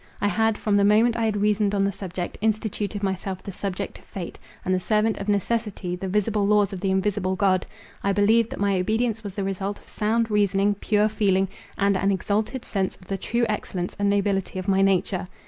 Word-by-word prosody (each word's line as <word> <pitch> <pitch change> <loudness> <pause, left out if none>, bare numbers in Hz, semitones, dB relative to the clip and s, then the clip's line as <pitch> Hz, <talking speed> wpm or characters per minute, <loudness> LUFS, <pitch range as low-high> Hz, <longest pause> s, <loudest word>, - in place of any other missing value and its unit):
I 205 - +1
had, 220 +1 +1
from 205 -2 +1
the 200 - +4
moment 220 +3 +4
I 230 - 0
had 215 -2 0
reasoned 205 0 +2
on 195 - +2
the 200 - +1
subject, 180 -2 -5
instituted 215 -1 -1
myself 190 -1 -2
the 195 - -6
subject 190 0 -4
to - - -17
fate, 180 -3 -8 0.3
and 185 - +1
the 185 - +2
servant 215 +3 +1
of 200 +1 -4
necessity, 205 -3 -1
the 190 +2 -5
visible 210 +1 +1
laws 205 -1 +3
of 190 - -4
the 195 +1 -1
invisible 190 0 0
God—I 190 +1 -1
believed 215 +3 +3
that - - -7
my 200 -2 +2
obedience 220 +3 0
was 200 -2 -6
the 200 - -2
result 195 +1 -2
of - - -21
sound 225 +1 0
reasoning, 205 -1 +3
pure 210 +1 +2
feeling, 195 -3 +1 0.3
and 200 -1 +2
an 195 +1 +1
exalted 210 +6 -1
sense 190 -2 -1
of 185 - -20
the 195 - -1
true 235 +4 0
excellence 185 -4 -3
and 200 0 +2
nobility 200 -2 0
of 185 +1 -4
my 195 -1 +3
nature. 190 -1 +1
200 Hz, 210 wpm, -24 LUFS, 190-210 Hz, 0.3 s, the